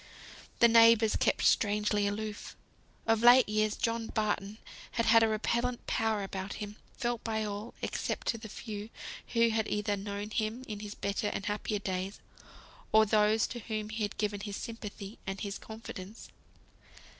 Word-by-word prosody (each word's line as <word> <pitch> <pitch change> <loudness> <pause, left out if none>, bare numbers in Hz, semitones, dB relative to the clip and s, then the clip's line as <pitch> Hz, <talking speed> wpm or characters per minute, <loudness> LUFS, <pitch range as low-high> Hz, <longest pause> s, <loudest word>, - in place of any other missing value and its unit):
The 235 - +7
neighbours 230 -1 +6
kept - - +1
strangely 210 -1 +3
aloof. 210 +1 -4 0.5
Of 225 0 +3
late 245 +2 +8
years 215 0 +1
John 230 -1 -1
Barton 210 -1 -1 0.4
had 230 - +1
had 225 0 +7
a 225 - +5
repellent 235 +3 -1
power 220 -2 0
about 195 0 -5
him, 210 0 -7 0.2
felt 240 -2 -2
by 220 -1 -1
all, 210 +3 -5
except - - -2
to 230 - 0
the 220 -1 -9
few 210 0 -6 0.4
who 230 -1 +4
had 220 -1 0
either 210 0 0
known 205 +1 -5
him 220 +3 -2
in 210 -2 -5
his 210 0 -7
better 200 +1 -1
and 200 - -3
happier 210 +1 -1
days, 190 0 -3 0.7
or 220 0 +6
those 215 +1 +3
to 240 - -6
whom 215 -1 -4
he 220 +1 -4
had 205 -1 -2
given 205 -1 -1
his 200 0 -5
sympathy 215 -2 -7
and 195 0 -4
his 200 -1 -4
confidence. 220 -2 -9
215 Hz, 165 wpm, -31 LUFS, 205-225 Hz, 0.7 s, late